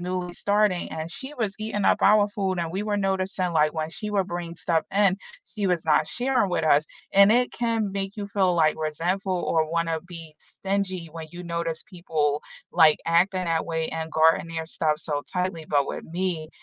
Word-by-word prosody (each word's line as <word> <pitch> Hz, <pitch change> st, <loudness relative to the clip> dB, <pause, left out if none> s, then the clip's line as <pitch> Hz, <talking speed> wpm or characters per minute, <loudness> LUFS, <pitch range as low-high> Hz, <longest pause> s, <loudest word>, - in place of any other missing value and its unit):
newly 180 Hz, 0 st, -3 dB
starting, 205 Hz, -2 st, +1 dB
and 160 Hz, 0 st, -5 dB
she 265 Hz, +10 st, -6 dB
was 215 Hz, -6 st, -2 dB
eating 215 Hz, -2 st, -2 dB
up -, -, +4 dB
our 205 Hz, 0 st, +6 dB
food 195 Hz, -3 st, -2 dB
and 165 Hz, -1 st, -2 dB
we 195 Hz, +3 st, -2 dB
were 210 Hz, -1 st, -1 dB
noticing, 190 Hz, -2 st, -1 dB
like, 150 Hz, -1 st, +3 dB
when 155 Hz, -1 st, -3 dB
she 210 Hz, +4 st, -6 dB
would 195 Hz, -3 st, +1 dB
bring 175 Hz, -1 st, -5 dB
stuff 160 Hz, -1 st, 0 dB
in, 195 Hz, -1 st, +3 dB, 0.4 s
she 205 Hz, -2 st, -1 dB
was 175 Hz, -3 st, 0 dB
not 155 Hz, -1 st, +3 dB
sharing 250 Hz, -5 st, +1 dB
with 170 Hz, -, 0 dB
us, 150 Hz, -1 st, +4 dB, 0.3 s
and 200 Hz, +1 st, +7 dB
it 245 Hz, +2 st, +3 dB
can 225 Hz, -4 st, -1 dB
make 195 Hz, +1 st, -4 dB
you 205 Hz, -1 st, -4 dB
feel, 190 Hz, -3 st, +1 dB
like, 155 Hz, -2 st, +3 dB
resentful 175 Hz, +5 st, -1 dB
or 160 Hz, -1 st, +1 dB
wanna 165 Hz, -1 st, 0 dB
be 165 Hz, -3 st, -9 dB
stingy 190 Hz, -3 st, -3 dB
when 165 Hz, -1 st, -7 dB
you 175 Hz, 0 st, -8 dB
notice 170 Hz, -1 st, -3 dB
people, 155 Hz, -6 st, -1 dB, 0.3 s
like, 160 Hz, -3 st, +6 dB
acting 180 Hz, +2 st, +2 dB
that 165 Hz, -1 st, 0 dB
way 160 Hz, -1 st, -1 dB
and 160 Hz, 0 st, -4 dB
guarding 160 Hz, +1 st, +3 dB
their 160 Hz, -1 st, -4 dB
stuff 155 Hz, -2 st, +1 dB
so 145 Hz, -2 st, -2 dB
tightly. 180 Hz, -3 st, -2 dB
But 145 Hz, -2 st, +2 dB
with -, -, -5 dB
me, 170 Hz, -2 st, -3 dB
175 Hz, 200 wpm, -25 LUFS, 160-195 Hz, 0.4 s, and